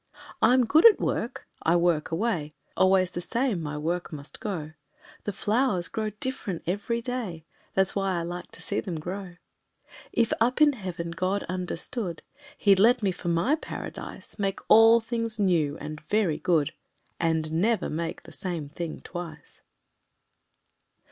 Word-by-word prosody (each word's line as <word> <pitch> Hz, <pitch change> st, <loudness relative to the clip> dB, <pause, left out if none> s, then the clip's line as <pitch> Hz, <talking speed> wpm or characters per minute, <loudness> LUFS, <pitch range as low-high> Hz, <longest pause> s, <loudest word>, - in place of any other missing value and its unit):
I'm 250 Hz, +2 st, +5 dB
good 310 Hz, +8 st, +5 dB
at 450 Hz, -, +5 dB
work -, -, -2 dB
I 165 Hz, -, +3 dB
work 170 Hz, -3 st, +2 dB
away; 165 Hz, -5 st, -1 dB, 0.2 s
Always 185 Hz, -1 st, +4 dB
the 175 Hz, -, -4 dB
same 230 Hz, 0 st, 0 dB
my 150 Hz, -1 st, -4 dB
work 170 Hz, +4 st, -2 dB
must 145 Hz, -2 st, -9 dB
go; 165 Hz, -8 st, -4 dB, 0.5 s
The 205 Hz, -, -1 dB
flowers 210 Hz, -3 st, +1 dB
grow 220 Hz, -1 st, -2 dB
different 215 Hz, -9 st, -3 dB
every 205 Hz, +6 st, -1 dB
day, 225 Hz, -11 st, -4 dB, 0.3 s
That's 190 Hz, -1 st, +2 dB
why 195 Hz, -2 st, 0 dB
I 170 Hz, -, -1 dB
like 175 Hz, +1 st, -6 dB
to -, -, -5 dB
see 200 Hz, -, -1 dB
them 175 Hz, -7 st, -4 dB
grow. 180 Hz, +2 st, -6 dB, 0.8 s
If, 230 Hz, -1 st, +2 dB
up 245 Hz, +4 st, +3 dB
in 300 Hz, -1 st, +6 dB
Heaven, 180 Hz, -7 st, -5 dB
God 185 Hz, +4 st, -1 dB
understood 180 Hz, +1 st, -4 dB, 0.3 s
He'd 195 Hz, -2 st, +5 dB
let 235 Hz, +2 st, +5 dB
me 195 Hz, -, +3 dB
for 175 Hz, -, -7 dB
my 170 Hz, -, +2 dB
Paradise 310 Hz, -, -6 dB
Make 195 Hz, -1 st, 0 dB
all 225 Hz, +1 st, +8 dB
things 230 Hz, -1 st, -2 dB
new 165 Hz, -7 st, +2 dB
and 150 Hz, 0 st, -7 dB
very 200 Hz, -8 st, +2 dB
good 165 Hz, -6 st, +2 dB, 0.5 s
And 160 Hz, -2 st, +1 dB
never 205 Hz, +8 st, +1 dB
make 165 Hz, +2 st, -4 dB
the -, -, -13 dB
same 170 Hz, -6 st, -4 dB
thing 165 Hz, +1 st, -5 dB
twice! 175 Hz, -2 st, -8 dB
185 Hz, 155 wpm, -27 LUFS, 165-220 Hz, 0.8 s, all